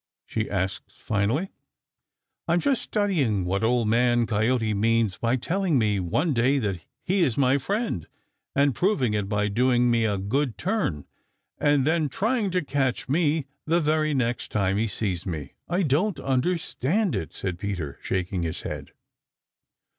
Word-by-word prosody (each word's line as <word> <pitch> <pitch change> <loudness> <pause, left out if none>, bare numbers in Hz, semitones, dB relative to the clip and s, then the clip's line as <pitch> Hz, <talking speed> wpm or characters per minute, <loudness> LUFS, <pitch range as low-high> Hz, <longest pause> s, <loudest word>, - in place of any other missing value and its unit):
she 110 -1 -3
asked 95 -1 -2
finally. 115 - -1 1.0
"I'm 170 +1 +3
just 270 +3 +1
studying 150 - 0
what 95 +4 -1
Old 115 0 +2
Man 120 +1 +3
Coyote 110 +1 +1
means 110 -1 +1
by 115 +2 +1
telling 170 +4 0
me 105 -4 +2
one 145 - 0
day 130 +3 +3
that 100 -8 -1 0.2
he 190 +1 +1
is 135 -9 +2
my 135 0 +3
friend, 200 - -2 0.5
and 140 0 +3
proving 135 - +1
it 105 -2 -1
by 105 0 +1
doing 120 +3 +3
me 115 -1 +2
a 105 -2 0
good 120 +6 -1
turn, 175 - -1 0.5
and 145 -2 +3
then 160 -1 +2
trying 220 - 0
to 180 -3 -1
catch 135 -3 -1
me 155 0 +1 0.2
the 165 +2 +3
very 155 -1 +1
next 120 -2 -1
time 100 -2 +1
he 115 +2 +1
sees 95 -4 -2
me. 75 -5 -5 0.2
I 180 +2 +1
don't 160 +6 +1
understand 165 - 0
it," 80 - -3
said 90 -3 -4
Peter, 90 -8 -4
shaking 90 0 -2
his 85 0 -3
head. - - -6
125 Hz, 155 wpm, -25 LUFS, 105-155 Hz, 1.0 s, I'm